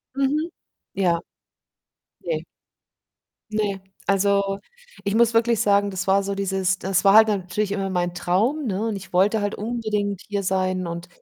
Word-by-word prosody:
Mhm. 295 Hz, +5 st, 0 dB, 0.4 s
Ja. 175 Hz, -3 st, +2 dB, 1.0 s
Ne. -, -, -2 dB, 1.1 s
Ne, 205 Hz, -3 st, -1 dB, 0.3 s
also, 200 Hz, 0 st, +2 dB, 0.5 s
ich 200 Hz, +2 st, 0 dB
muss 235 Hz, 0 st, +4 dB
wirklich 230 Hz, -1 st, +3 dB
sagen, 200 Hz, -2 st, +3 dB
das 190 Hz, 0 st, -3 dB
war 195 Hz, +1 st, +4 dB
so 200 Hz, 0 st, -3 dB
dieses 190 Hz, -1 st, 0 dB
das 190 Hz, 0 st, 0 dB
war 195 Hz, -, +7 dB
halt 220 Hz, +1 st, +8 dB
natürlich 200 Hz, +1 st, -1 dB
immer 195 Hz, -1 st, -1 dB
mein 175 Hz, -1 st, -1 dB
Traum, 215 Hz, -, 0 dB
ne, 210 Hz, +1 st, -1 dB
und 215 Hz, -, -2 dB
ich 190 Hz, -2 st, -12 dB
wollte 200 Hz, +5 st, +3 dB
halt 205 Hz, 0 st, -1 dB
unbedingt 210 Hz, -3 st, -2 dB
hier 200 Hz, -1 st, -2 dB
sein 185 Hz, -1 st, 0 dB
und 170 Hz, +1 st, -6 dB
200 Hz, 155 wpm, -23 LUFS, 190-215 Hz, 1.1 s, halt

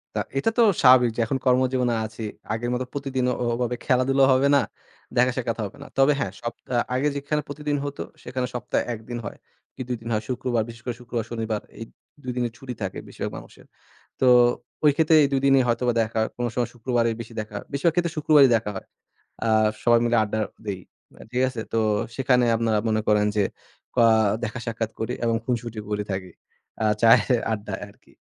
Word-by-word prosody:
তা -, -, +1 dB, 0.2 s
এটা 180 Hz, -, +2 dB
তো -, -, +5 dB, 0.2 s
স্বাভাবিক 125 Hz, -2 st, +7 dB
যে, -, -, -5 dB
এখন 135 Hz, +3 st, -1 dB
কর্মজীবনে 125 Hz, -1 st, +2 dB
আছি। 110 Hz, +1 st, -8 dB, 0.3 s
আগের 120 Hz, +2 st, -2 dB
মতো 125 Hz, +1 st, -1 dB
প্রতিদিন 135 Hz, -2 st, -2 dB
ও -, -, 0 dB, 0.2 s
ওভাবে 125 Hz, 0 st, -1 dB
খেলাধুলাও 135 Hz, +1 st, +3 dB
হবে 135 Hz, +2 st, +3 dB
না, 140 Hz, -, +5 dB, 0.5 s
দেখা-সাক্ষাৎও 120 Hz, -2 st, +1 dB
হবে 100 Hz, -, -9 dB
না। -, -, -11 dB
তবে 135 Hz, +2 st, +5 dB
হ্যাঁ, 100 Hz, -, -2 dB
সপ্তাহ 120 Hz, +1 st, -3 dB, 0.2 s
আগে 140 Hz, +3 st, +1 dB
যেখানে 145 Hz, +2 st, -1 dB
প্রতিদিন 150 Hz, 0 st, -3 dB
হতো, 145 Hz, 0 st, -5 dB, 0.2 s
সেখানে 125 Hz, -1 st, -3 dB
সপ্তাহে 125 Hz, 0 st, -1 dB
১ 110 Hz, -, -6 dB
দিন 120 Hz, -, -3 dB
হয়, -, -, -7 dB, 0.4 s
কি -, -, -7 dB
২ 125 Hz, -, -1 dB
দিন 115 Hz, -, -9 dB
হয়। 110 Hz, 0 st, 0 dB
শুক্রবার 125 Hz, -2 st, 0 dB
বিশেষ 115 Hz, 0 st, -11 dB
করে 120 Hz, -1 st, -3 dB
শুক্রবার, 120 Hz, -2 st, -3 dB
শনিবার 110 Hz, -2 st, -2 dB, 0.2 s
এই 115 Hz, -, -4 dB, 0.4 s
২ 125 Hz, -, -3 dB
দিনের 120 Hz, -1 st, 0 dB
ছুটি 125 Hz, -2 st, -7 dB
থাকে 95 Hz, -2 st, -3 dB
বেশিরভাগ -, -, -5 dB
মানুষের। -, -, -13 dB, 0.6 s
তো, 130 Hz, -, +3 dB, 0.6 s
ওই 150 Hz, -, +8 dB
ক্ষেত্রে 160 Hz, 0 st, +4 dB
এই 140 Hz, -, +3 dB
২ 135 Hz, -, +2 dB
দিনই 135 Hz, -1 st, +5 dB
হয়তোবা 120 Hz, +1 st, +1 dB
দেখা 110 Hz, 0 st, 0 dB, 0.2 s
কোন 120 Hz, 0 st, -1 dB
সময় 120 Hz, -1 st, 0 dB
শুক্রবারই 120 Hz, -1 st, 0 dB
বেশি 115 Hz, 0 st, -8 dB
দেখা 105 Hz, -1 st, -8 dB
হয়। -, -, -7 dB
বেশিরভাগ 150 Hz, +4 st, +1 dB
ক্ষেত্রে 170 Hz, -2 st, 0 dB
শুক্রবারই 150 Hz, -3 st, +6 dB
দেখা 110 Hz, -2 st, -3 dB
হয়। -, -, -7 dB, 0.6 s
আ -, -, +1 dB, 0.4 s
সবাই 120 Hz, -1 st, +5 dB
মিলে 120 Hz, 0 st, +2 dB
আড্ডা 110 Hz, +1 st, -2 dB, 0.3 s
দেই। 100 Hz, -3 st, -3 dB, 0.3 s
মা -, -, -19 dB
ঠিক 125 Hz, +1 st, 0 dB
আছে? 120 Hz, -4 st, -5 dB
তো, -, -, +2 dB, 0.4 s
সেখানে 125 Hz, -2 st, +3 dB
আপনারা 115 Hz, -1 st, +1 dB
মনে 110 Hz, 0 st, +1 dB
করেন 105 Hz, -1 st, +4 dB
যে, 105 Hz, -, +3 dB, 0.5 s
পা 120 Hz, -, +5 dB, 0.4 s
দেখা-সাক্ষাৎ 115 Hz, -1 st, -3 dB
করি 110 Hz, +2 st, -2 dB
এবং 115 Hz, -1 st, +2 dB
খুনশুটি 120 Hz, -2 st, -3 dB
করে 105 Hz, 0 st, -1 dB
থাকি, 95 Hz, -1 st, -4 dB, 0.5 s
আ -, -, +2 dB, 0.2 s
চায়ের 115 Hz, +2 st, +5 dB
আড্ডায় 105 Hz, -1 st, -4 dB
আরকি। 100 Hz, -, -23 dB
120 Hz, 195 wpm, -24 LUFS, 115-130 Hz, 0.6 s, ওই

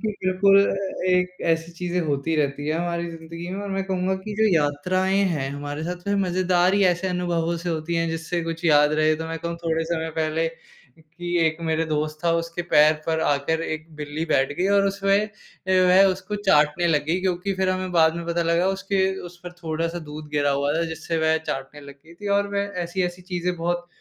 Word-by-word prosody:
कि 220 Hz, -, -1 dB
बिल्कुल 190 Hz, +1 st, +4 dB
अ, 195 Hz, -2 st, -3 dB
एक 180 Hz, 0 st, +1 dB
ऐसी 165 Hz, +1 st, -1 dB
चीज़ें 180 Hz, +1 st, -2 dB
होती 145 Hz, +2 st, -1 dB
रहती 145 Hz, -1 st, -1 dB
हैं, 155 Hz, -, +1 dB
हमारी 170 Hz, 0 st, -2 dB
ज़िंदगी 165 Hz, +1 st, -8 dB
में 195 Hz, +2 st, -4 dB
और 205 Hz, -, -5 dB
मैं 195 Hz, 0 st, -1 dB
कहूँगा 190 Hz, 0 st, 0 dB
कि 215 Hz, -, -5 dB
जो 220 Hz, 0 st, +4 dB
यात्राएँ 180 Hz, +6 st, +1 dB, 0.2 s
हैं, 135 Hz, -3 st, -2 dB
हमारे 145 Hz, +1 st, -5 dB
साथ 180 Hz, +2 st, -6 dB
में 200 Hz, -, +2 dB
मज़ेदार 180 Hz, +1 st, +2 dB
ही 200 Hz, -, +3 dB
ऐसे 180 Hz, +1 st, +2 dB
अनुभवों 170 Hz, -2 st, -1 dB
से 170 Hz, +1 st, -5 dB
होती 165 Hz, 0 st, -2 dB
हैं 165 Hz, 0 st, +1 dB
जिससे 165 Hz, +2 st, -3 dB
कुछ 165 Hz, 0 st, -5 dB
याद 150 Hz, -2 st, +5 dB
रहे। 155 Hz, 0 st, +3 dB
तो 160 Hz, +1 st, -5 dB
मैं 165 Hz, 0 st, -4 dB
कहूँ 170 Hz, +1 st, -4 dB
थोड़े 165 Hz, 0 st, 0 dB
समय 160 Hz, -1 st, -2 dB
पहले 160 Hz, +1 st, 0 dB, 0.5 s
कि 175 Hz, +2 st, -5 dB
एक 160 Hz, 0 st, 0 dB
मेरा 160 Hz, 0 st, 0 dB
दोस्त 155 Hz, 0 st, -2 dB
था 170 Hz, -, +3 dB
उसके 170 Hz, +1 st, -2 dB
पैर 150 Hz, +1 st, +6 dB
पर 160 Hz, -1 st, 0 dB
आकर 145 Hz, +2 st, +1 dB
एक 155 Hz, -1 st, -4 dB
बिल्ली 150 Hz, +1 st, -4 dB
बैठ 135 Hz, -3 st, +2 dB
गई 185 Hz, -, +2 dB
और 200 Hz, -, +4 dB
उसमें 195 Hz, +1 st, +1 dB, 0.4 s
वह 185 Hz, 0 st, +5 dB
उसको 190 Hz, +3 st, -5 dB
चाटने 170 Hz, -4 st, +3 dB
लग 150 Hz, -4 st, +2 dB
गई, 175 Hz, +4 st, 0 dB
क्योंकि 185 Hz, +1 st, -1 dB
फिर 190 Hz, 0 st, 0 dB
हमें 185 Hz, 0 st, -2 dB
बाद 160 Hz, -2 st, +4 dB
में 170 Hz, -, -5 dB
पता 170 Hz, 0 st, 0 dB
लगा 170 Hz, +2 st, +2 dB
उसके 195 Hz, 0 st, 0 dB, 0.2 s
उस 175 Hz, 0 st, -12 dB
पर 175 Hz, -, -7 dB
थोड़ा-सा 165 Hz, +2 st, -2 dB
दूध 150 Hz, 0 st, -8 dB
गिरा 145 Hz, -1 st, +1 dB
हुआ 140 Hz, +1 st, +1 dB
था 165 Hz, -, +1 dB
जिससे 160 Hz, +1 st, -3 dB
वह 160 Hz, 0 st, +3 dB
चाटने 135 Hz, +2 st, -5 dB
लग 140 Hz, -1 st, -11 dB
गई 170 Hz, -, -14 dB
थी। 205 Hz, +4 st, -7 dB
और 200 Hz, -, 0 dB
वह 200 Hz, 0 st, -1 dB
ऐसी-ऐसी 180 Hz, +1 st, -3 dB
चीज़ें 180 Hz, -1 st, -2 dB
बहुत 175 Hz, +1 st, -2 dB
170 Hz, 210 wpm, -24 LUFS, 160-185 Hz, 0.5 s, पैर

